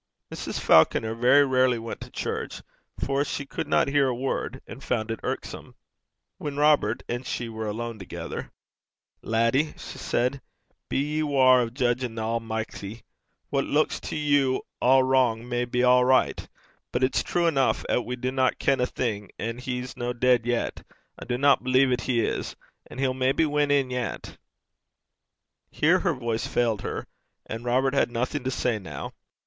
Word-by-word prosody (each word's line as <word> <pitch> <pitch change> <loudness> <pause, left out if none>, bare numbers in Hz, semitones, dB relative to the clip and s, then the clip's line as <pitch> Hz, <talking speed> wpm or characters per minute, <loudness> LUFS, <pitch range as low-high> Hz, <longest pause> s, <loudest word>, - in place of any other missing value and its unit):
Mrs. - - -4
Falconer 110 +7 +4
very 130 +5 +5
rarely 130 -2 +3
went 115 0 -6
to - - -8
church, - - -4 0.3
for 140 +1 0
she 140 -1 -4
could - - -5
not - - +3
hear 140 -1 +3
a 125 - 0
word, 130 0 -3
and 135 - -10
found 115 -2 -1
it 115 - -4
irksome. - - -5 0.6
When 145 -1 -5
Robert 145 -7 +3
and 120 +1 -3
she 120 -1 -3
were 110 -1 -5
alone 115 +1 -4
together, 95 - -6 0.7
'Laddie,' 115 +7 +1
she - - -9
said, 130 +3 -1 0.5
'be - - -1
ye 150 +3 0
waure 130 -4 +5
o' 120 - -1
judgin' 120 -1 -1
the 110 - -3
Almichty. 110 -1 -4 0.5
What - - +1
luiks - - +1
to - - -4
you 145 -3 +2 0.2
a' 130 +1 +5
wrang 125 -3 +2
may 120 0 -1
be 125 0 -1
a' 125 0 +5
richt. 130 0 +2 0.4
But 125 - 0
it's 130 - +2
true 175 -1 0
eneuch 140 -5 +2
'at 125 - +1
we 125 - -4
dinna 130 +1 +1
ken 135 -1 +1
a'thing; 110 -5 -2
an' 115 +2 -4
he's 125 0 -4
no 120 0 -3
deid 120 -1 +2
yet 120 -1 -1 0.4
I - - -8
dinna 135 +3 +3
believe 130 +1 +3
'at 125 -1 +1
he 120 -3 +2
is - - -3 0.3
and - - -10
he'll 135 -1 +1
maybe 130 +4 +2
win 150 -1 +1
in 140 -3 +2
yet.' 125 -2 -4 1.3
Here - - +3
her - - +1
voice 115 -2 -2
failed 115 -4 0
her. - - -4 0.4
And 115 +1 -6
Robert 130 +2 +1
had 140 - +2
nothing 125 +4 -2
to - - +1
say 125 -3 -1
now. 95 - -7
125 Hz, 170 wpm, -26 LUFS, 115-135 Hz, 1.3 s, very